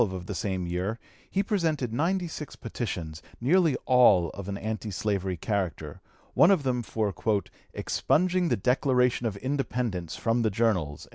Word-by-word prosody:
On - - +5
March - - -7
12, 95 - -4
of - - -13
the 100 - -4
same 95 -1 -2
year, 90 +6 -2 0.3
he 195 - +1
presented 160 - 0
ninety 175 +7 0
six 150 -2 -7
petitions, 90 -10 -5 0.2
nearly 160 +3 +3
all 105 -10 +5
of 100 0 -7
an 100 - -3
anti 110 +1 -4
slavery 95 -2 -1
character, 95 -2 -3 0.3
one 160 +7 +6
of 190 -7 +4
them 125 -2 0
for 110 -2 -2 0.6
"expunging 180 +1 +1
the - - +2
Declaration 125 +1 +2
of 100 -3 -4
Independence 125 - -2
from 115 +1 0
the 110 - +2
Journals." 95 -9 0
115 Hz, 165 wpm, -27 LUFS, 95-135 Hz, 0.6 s, one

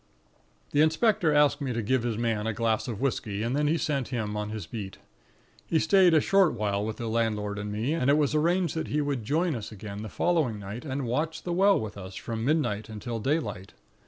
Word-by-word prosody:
"The 145 - +3
inspector 160 +1 +3
asked 150 0 +3
me 130 -3 -2
to 115 - -1
give 130 +4 +1
his 115 -2 -2
man 115 -2 -1
a 115 - 0
glass 110 +1 0
of 115 -4 -4
whisky, 110 -6 -1
and 120 +3 -1
then 150 +1 +1
he 160 +3 +2
sent 145 -7 -1
him 110 -5 -3
on 105 0 -3
his 110 -4 -5
beat. 100 +1 -7 0.7
He 165 - +2
stayed 180 +1 +5
a - - +7
short 195 0 +3
while 105 -3 -1
with 110 0 -4
the 115 - -4
landlord 105 -2 -1
and 105 0 -4
me, 110 +8 -1
and 140 -5 +1
it 145 - +5
was 150 -1 +1
arranged 170 +3 +2
that 160 - -3
he 150 - 0
would 140 -5 -1
join 160 +8 +1
us 115 -4 -6
again 105 -1 -7
the 110 - -6
following 155 -10 +1
night 105 +6 -7
and 135 -1 -3
watch 150 +7 -2
the 175 - -2
Well 195 +3 +4
with 105 -2 -6
us 95 0 -9
from 115 -1 -4
midnight 115 -8 0
until 115 +2 -5
daylight. 110 - -2
120 Hz, 225 wpm, -27 LUFS, 105-155 Hz, 0.7 s, a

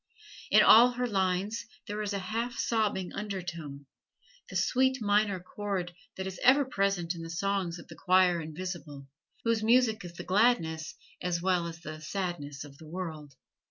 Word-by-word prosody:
In - - +7
all 245 +3 +8
her 250 +1 -1
lines 195 +2 -1 0.2
there 210 +1 -4
is 210 -1 -2
a 200 - -1
half 225 +5 -3
sobbing 210 -5 0
undertone 170 -8 -5 0.6
the - - -9
sweet 260 +1 +2
minor 205 -2 +2
chord 185 -1 -4 0.2
that 190 - -3
is 190 -1 -6
ever 270 +3 +5
present 195 -7 0
in 170 - -8
the 165 - -7
songs 185 0 -1
of 170 - -12
the - - -10
Choir 180 -2 +3
Invisible, 160 -3 -6 0.4
whose 230 -1 +1
music 225 -1 +3
is 175 -1 -8
the - - -8
gladness 185 -7 +1 0.3
as 175 -1 -1
well 180 -1 +1
as 165 0 -8
the 155 -2 -8
sadness 155 -5 -4
of 140 -1 -13
the 160 - -12
world. 155 -5 -6
185 Hz, 165 wpm, -30 LUFS, 170-215 Hz, 0.6 s, all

